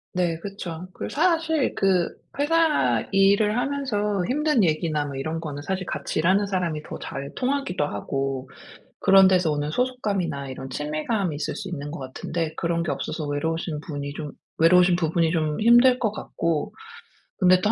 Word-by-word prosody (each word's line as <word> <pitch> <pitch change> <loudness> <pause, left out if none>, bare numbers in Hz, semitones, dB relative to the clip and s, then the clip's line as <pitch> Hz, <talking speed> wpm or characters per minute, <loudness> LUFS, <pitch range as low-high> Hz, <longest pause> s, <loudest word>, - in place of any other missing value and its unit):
네, 175 -3 +1
그쵸. 180 -2 -6
그 - - -5
사실 320 -2 +1
그 185 -3 +2 0.3
회사 295 - +2
일을 200 +3 +4
하면서 210 -8 -1
힘든 300 -4 +2
얘기나 155 -2 0
뭐 140 - -6
이런거는 150 0 -4
사실 190 +1 -3
같이 - - -3
일하는 190 +5 +3
사람이 175 -6 -2
더 - - -7
잘 140 0 -6
통하기도 255 - -1
하고. 135 +4 -3 0.5
그런 195 -1 +7
데서 180 -3 +3
오는 150 0 -2
소속감이나 200 - -1
이런 130 0 -7
친밀감이 155 - -2
있을 150 - -3
수 195 - -6
있는 145 -4 -5
것 160 - -6
같은데 155 +5 -4
그런 170 0 0
게 170 - -2
없어서 155 -1 -3
외로우신 155 +1 -2
분이 145 -2 -6
좀 150 -2 -6 0.2
외로우신 180 +2 +5
부분이 165 -1 +1
좀 155 -1 -1
힘들 240 +3 +6
것 220 -4 +1
같고. 165 -6 -2 0.7
근데 185 -1 +5
또 210 - +2
175 Hz, 330 characters per minute, -24 LUFS, 150-205 Hz, 0.7 s, 그런